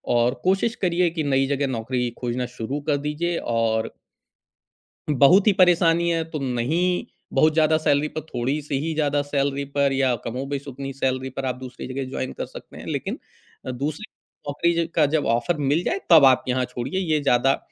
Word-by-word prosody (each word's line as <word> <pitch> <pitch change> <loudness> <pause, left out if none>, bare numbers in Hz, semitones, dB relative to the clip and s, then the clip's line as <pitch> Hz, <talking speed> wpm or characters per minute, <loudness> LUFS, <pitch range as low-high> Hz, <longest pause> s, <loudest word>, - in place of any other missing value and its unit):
और 120 +1 +3
कोशिश 195 +5 +1
करिए 175 -1 +2
कि 160 - -1
नई 135 0 +3
जगह 140 0 0
नौकरी 125 +2 -2
खोजना 125 0 -2
शुरू 130 +6 -3
कर 145 - +3
दीजिए 170 +3 -1 0.2
और 110 -1 0 1.2
बहुत 150 - +5
ही 210 - +6
परेशानी 170 -2 +4
है 165 -1 +1
तो 155 - -4
नहीं, 145 +8 0 0.3
बहुत 155 0 +4
ज़्यादा 155 0 +4
सैलरी 145 -1 +1
पर 155 - -5
थोड़ी-सी 140 0 -2
ही 160 +2 -2
ज़्यादा 145 -2 +1
सैलरी 140 -1 -1
पर 140 -1 +3
या 135 -2 +2
कमोबेश 135 +4 -4
ही - - -5
उतनी 135 +1 -6
सैलरी 130 -1 -2
पर 135 +1 -5
आप 130 - -1
दूसरी 130 -1 -8
जगह 135 +1 -3
जॉइन 130 -1 -4
कर - - -5
सकते - - -12
हैं - - -10
लेकिन - - -3 0.5
अ, - - -3
दूसरे 145 - -4 0.4
नौकरी 170 +4 +1
ज - - -8
का 155 -3 +4
जब 155 - +1
ऑफ़र 120 +9 +1
मिल 145 +3 +1
जाए 385 - -1
तब 160 -4 +8
आप 130 -1 +5
यहाँ 130 0 +1
छोड़िए। 125 +8 -4
ये 160 -5 +1
ज़्यादा 135 0 +3
140 Hz, 190 wpm, -23 LUFS, 130-160 Hz, 1.2 s, तब